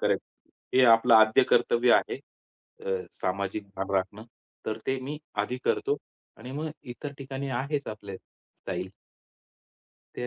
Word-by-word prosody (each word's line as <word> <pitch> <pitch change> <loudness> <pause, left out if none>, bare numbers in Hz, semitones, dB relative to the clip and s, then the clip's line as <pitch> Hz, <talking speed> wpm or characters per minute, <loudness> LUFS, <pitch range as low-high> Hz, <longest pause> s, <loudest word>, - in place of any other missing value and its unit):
Correct. - - +2 0.5
हे 130 - +6
आपलं 115 0 +6
आद्य 110 0 +7
कर्तव्य 120 +1 +4
आहे. - - +2 0.7
अ, 95 -1 0 0.2
सामाजिक 100 +2 -2
भान 95 +1 -3
राखणं. 95 +3 -1 0.4
तर 110 0 -2
ते 130 0 +1
मी 145 +3 -5 0.2
आधी 125 +5 -3
करतो. 140 - +1 0.4
आणि 125 +3 -9
मग 155 +3 -3 0.2
इतर 140 +3 -7
ठिकाणी 135 0 -5
आहेच 140 +1 -2
आपले 100 -3 -7 0.4
स्टाईल. 90 +1 -4 1.2
ते - - -3
115 Hz, 135 wpm, -28 LUFS, 100-135 Hz, 1.2 s, आद्य